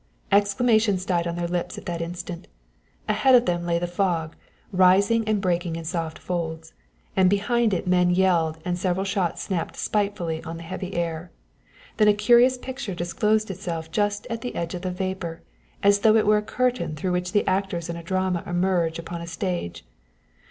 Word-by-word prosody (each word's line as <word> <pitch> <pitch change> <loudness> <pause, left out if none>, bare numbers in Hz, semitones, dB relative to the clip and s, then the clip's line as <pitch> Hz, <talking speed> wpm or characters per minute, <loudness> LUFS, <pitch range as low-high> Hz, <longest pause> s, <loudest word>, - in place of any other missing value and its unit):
Exclamations 205 -1 +3
died 175 -2 0
on 170 - -3
their 175 0 -2
lips 175 0 -3
at - - -9
the 170 -1 -3
instant. 175 +1 -6 0.6
Ahead 265 -1 +4
of 245 0 +5
them 175 0 -1
lay 170 -1 +2
the 175 - -1
fog, 175 -3 -1 0.4
rising 195 +4 +4
and 215 -1 +2
breaking 175 -3 -1
in 165 - -5
soft 165 -1 -3
folds, 160 -2 -4 0.4
and 185 -1 +5
behind 215 +3 +2
it 185 - -1
men 180 -1 +3
yelled 175 -3 +2
and 180 0 -1
several 185 +1 0
shots 195 -3 -1
snapped 175 -5 -3
spitefully 200 -6 -1
on 165 +1 -6
the 165 - -9
heavy 185 +2 -6
air. 170 0 -2 0.7
Then 215 - +5
a 210 - +5
curious 240 +4 +5
picture 255 -6 -6
disclosed 210 +5 0
itself 165 -3 -5
just 205 +2 0
at 230 0 -3
the 245 - -5
edge 170 -1 -3
of 180 - -5
the 185 - -2
vapor, 180 -2 -4 0.4
as 200 0 +5
though 215 +1 +5
it 220 - +4
were 210 +1 +5
a - - 0
curtain 225 -8 -1
through 180 +5 -2
which 180 +1 -2
actors 185 -3 -1
in 170 - -4
a 170 - -6
drama 185 0 -1
emerged 175 -2 +1
upon 170 0 -6
a 170 - -7
stage. 175 - -4
180 Hz, 185 wpm, -24 LUFS, 170-205 Hz, 0.7 s, of